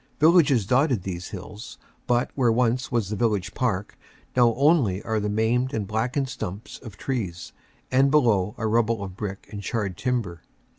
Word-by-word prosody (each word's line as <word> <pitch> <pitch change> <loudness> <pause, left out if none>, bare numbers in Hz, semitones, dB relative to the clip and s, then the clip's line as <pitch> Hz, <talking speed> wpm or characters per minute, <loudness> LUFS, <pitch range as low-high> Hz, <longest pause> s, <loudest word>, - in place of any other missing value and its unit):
Villages 150 - +5
dotted 130 - +2
these 90 -2 -5
hills, 105 +5 -9 0.3
but 120 0 +1
where 125 -4 +2
once 125 +2 +1
was 115 -5 0
the - - -1
village 105 -3 0
park, 110 -7 -2 0.4
now 120 -2 +5
only 135 - +3
are 110 -1 -1
the 105 0 -2
maimed 115 +5 +1
and 105 -2 -2
blackened 120 +7 -1
stumps 110 -5 -6
of 105 -4 -11
trees 100 -11 -4 0.4
and 135 +2 +4
below 115 -8 +2
a 110 - -3
rubble 115 -1 +1
of 95 -2 -7
brick 100 -2 -6
and 105 -2 -6
charred 100 -3 -3
timber. 115 -10 -2
115 Hz, 165 wpm, -25 LUFS, 100-125 Hz, 0.4 s, Villages